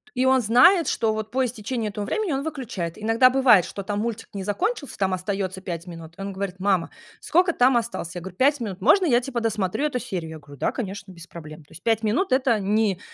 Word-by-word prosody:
и 255 - +1
он 260 0 +4
знает, 315 - +5
что, 220 -2 +1
вот, 220 0 -4
по 260 0 +1
истечении 225 -1 -3
этого 205 +1 -5
времени 405 - -1
он 275 +1 -1
выключает. 240 - -5
Иногда 225 +4 +4
бывает, 250 -8 +5
что, 200 - -7
там, 205 +1 -3
мультик 230 0 -4
не 195 -2 -5
закончился, 290 - -2
там 190 -2 0
остается 190 0 -3
5 170 -2 -5
минут. 165 -2 -10
И - - -8
он 195 0 -5
говорит: 190 -1 -4
"Мама, 190 -3 +1 0.3
сколько 350 0 +2
там 250 0 +4
осталось?" 225 -6 -4
Я 175 - -5
говор: 190 +1 -8
"5 280 +4 +3
минут". 200 -5 -5
Можно 380 - +5
я, 245 -6 +3
типа, 245 -2 -3
досмотрю 220 +3 -1
эту 260 -4 -1
серию? 170 -7 -5
Я 160 - -8
говорю: 145 -1 -14
"Да, - - 0
конечно, 200 -4 -6
без 170 -1 -12
проблем". 155 -2 -11
То 150 - -28
есть 170 - -13
5 225 -1 +2
минут 240 - 0
это 255 -4 +2
не, 200 -1 +1
215 Hz, 235 wpm, -24 LUFS, 185-255 Hz, 0.3 s, знает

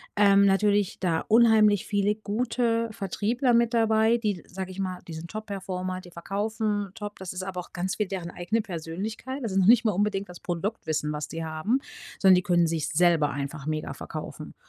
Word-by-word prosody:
ähm, 200 -1 +6
natürlich 200 0 +2
da 170 -4 0
unheimlich 220 -3 +5
viele 205 0 +1
gute 230 +2 0
Vertriebler 225 +5 0
mit 235 0 +3
dabei, 225 0 +3
die- 210 -6 -2
sage 190 0 -6
ich 185 - -9
mal- 185 -2 -3
die 165 - -7
sind 160 +2 -7
Top-performer, 185 -3 -4
die 175 - -14
verkaufen 205 +3 -2
Top. 210 -2 -7
Das 190 -2 -6
ist 185 0 -5
aber 185 -1 -4
auch 180 - -8
ganz 185 +1 -2
viel 210 - 0
deren 180 -3 -5
eigene 205 +7 -1
Persönlichkeit. 210 - -5
Das 225 - -2
ist 190 - +2
noch 190 - +3
nicht 235 +1 +6
mal 215 - +4
unbedingt 200 0 -1
das 180 - -10
Produktwissen, 165 -4 -2
was 150 0 -4
die 165 +1 -5
haben. 160 +11 0 0.4
Sondern 190 -1 +7
die 180 - +3
können 175 -1 +3
sich 160 -2 -1
es - - -4
selber 165 -3 +4
einfach 140 +1 -5
mega 155 0 -2
verkaufen. - - -7
195 Hz, 195 wpm, -27 LUFS, 175-215 Hz, 0.4 s, Sondern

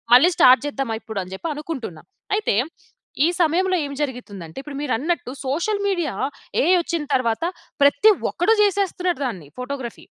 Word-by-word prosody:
మళ్ళీ 275 +8 +7
స్టార్ట్ 255 +1 +7
చేద్దామా 270 -5 -2
ఇప్పుడు, 220 -2 -5
అని 185 +1 -10
జెప్పి 190 - -5
అనుకుంటున్నా. 280 - -6 0.3
అయితే, 415 - +1 0.7
ఈ - - +4
సమయంలో 365 +3 +2
ఏం 280 - -6
జరిగుతుంది 240 -9 -6
అంటే, 160 - -17
ఇప్పుడు 285 -1 -7
మీరన్నట్టు 290 +1 -1 0.2
సోషల్ 400 +9 0
మీడియా, 345 - -1 0.5
ఏఐ 350 +5 +4
వచ్చిన 335 -2 -2
తర్వాత, 235 +2 0 0.4
ప్రతి 285 +10 +6 0.2
ఒక్కడు 410 +6 +2
చేసేస్తున్నాడు 375 -4 0
దాన్ని. 185 - -7
ఫోటోగ్రఫీ. 250 -1 -6
285 Hz, 145 wpm, -22 LUFS, 245-350 Hz, 0.7 s, మళ్ళీ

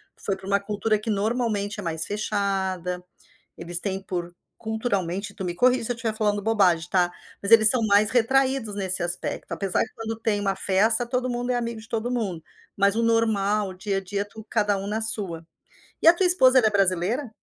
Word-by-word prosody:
Foi 195 -2 -3
pra 195 0 -12
uma 200 0 +2
cultura 210 +2 -1
que 215 - -6
normalmente 210 -1 -1
é - - -6
mais 160 -2 -2
fechada, 190 -4 -2 0.5
eles 170 0 -1
têm 195 0 -4
por, 175 -2 -5 0.2
culturalmente 210 -4 -3
tu 190 - -7
me 175 -1 -3
corrige 250 +5 +2
se 245 - -1
eu - - -9
tiver 230 -1 -3
falando 210 -2 -1
bobagem, 190 -6 +2
tá. 180 -2 +2 0.3
Mas 200 +2 0
eles 220 -1 +10
são 255 - +2
mais 205 +1 +3
retraídos 260 -2 +1
nesse 190 -3 0
aspecto, 175 +1 0
apesar 195 -2 0
que, - - -7
quando 225 0 -6
tem 210 -2 0
uma 195 -1 -1
festa, 220 +5 +2
todo 250 +1 -2
mundo 245 +1 -3
é - - -1
amigo 235 -2 -4
de 220 - -14
todo 230 0 -3
mundo, 200 -9 -3 0.3
mas 200 +1 +2
o 230 - 0
normal, 215 -3 +1
o 185 - -8
dia 195 +1 -3
a - - -3
dia, 200 +1 -4
tu 220 +1 -13
cada 210 -2 +1
um 195 0 -6
na 215 +2 -2
sua. 200 -8 +1 0.6
E - - +2
a 335 - +9
tua 370 +2 0
esposa, 265 -8 +5
ela 235 -4 +5
é - - 0
brasileira? 200 +6 +1
210 Hz, 210 wpm, -24 LUFS, 195-230 Hz, 0.6 s, eles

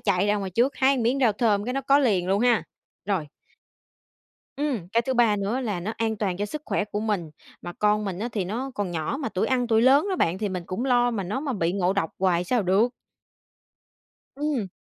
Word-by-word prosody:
chạy 200 -1 +1
ra 210 0 +2
ngoài 195 -2 -4
trước, 240 +9 +1
hái 270 +1 +4
một 250 - -1
miếng 250 +4 +1
rau 235 -5 +4
thơm 205 -2 +1
cái 250 - -2
nó 275 - 0
có 275 +1 +4
liền 195 -10 +1
luôn 200 +2 +2
ha. 240 -2 +3 0.4
Rồi. 190 -6 -1 1.3
Ừm, 270 - -2
cái 230 +1 +3
thứ 260 +2 -2
ba 230 -4 +4
nữa 205 +6 -1
là 210 -8 -2
nó 210 +5 -3
an 225 -1 -1
toàn 195 -4 -1
cho 205 +1 -2
sức 300 +7 -6
khỏe 210 - -1
của 210 0 -4
mình, 205 -8 -2 0.3
mà 175 - -6
con 210 +2 +1
mình 190 -3 -4
á, 235 +3 -2
thì 200 -4 -1
nó 235 +9 -4
còn 200 -3 -2
nhỏ, 160 - -2
mà 270 - -2
tuổi 190 -2 -1
ăn 250 -2 +1
tuổi 225 -1 +3
lớn 275 +8 +5
đó 375 - 0
bạn 175 - +1
thì 210 - -1
mình 180 -2 -4
cũng 210 +8 -3
lo 245 -2 +3
mà 220 -4 -2
nó 205 +9 -3
mà 285 -3 -2
bị 170 -5 0
ngộ 185 -1 +1
độc 195 -5 -1
hoài 180 -2 +2
sao 240 +3 +1
được. 195 +6 +3 1.5
Ừm. 290 -7 -1
210 Hz, 240 wpm, -25 LUFS, 190-245 Hz, 1.5 s, lớn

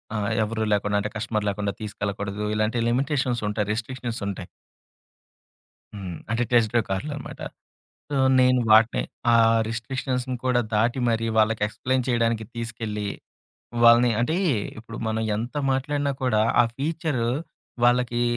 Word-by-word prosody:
ఆహ్, 105 -1 -1
ఎవరు 110 +1 -2
లేకుండా, 105 0 0
అంటే 105 - -2
కస్టమర్ 110 -1 -2
లేకుండా 100 0 -2
తీసుకెళ్లకూడదు. 100 -1 -4
ఇలాంటి 110 +2 0
లిమిటేషన్సుంటాయి. 120 -6 0
రిస్ట్రిక్షన్స్‌ 120 +1 -4
ఉంటాయి. 95 -2 -5 1.5
హ్మ్. 95 -5 -6
అంటే 115 +1 +1
టెస్ట్ 115 -3 +4
డ్రైవ్ 120 -2 +2
కార్లన్నమాట. 145 +8 -4 0.7
సో, 145 - -2 0.2
నేను 125 0 +4
వాటిని 110 +1 +5 0.3
ఆ - - +6 0.3
రిస్ట్రిక్షన్స్‌ని 125 +2 -3
కూడా 125 -1 +3
దాటి 115 +4 +2
మరి 115 0 0
వాళ్ళకి 110 0 +2
ఎక్స్‌ప్లేయిన్ 130 +3 -1
చేయడానికి 115 -2 +1
తీసుకెళ్ళి, 110 -3 -4 0.8
వాళ్ళని 120 +1 +7
అంటే 140 +8 +1 0.4
ఇప్పుడు 115 +1 -9
మనం 110 0 -1
ఎంత 120 +5 -4 0.2
మాట్లాడినా 140 +1 -1
కూడా, 110 -4 +2 0.2
ఆ - - +2
ఫీచరు 150 -4 -1 0.6
వాళ్ళకి 120 0 +2
115 Hz, 125 wpm, -24 LUFS, 105-125 Hz, 1.5 s, వాళ్ళని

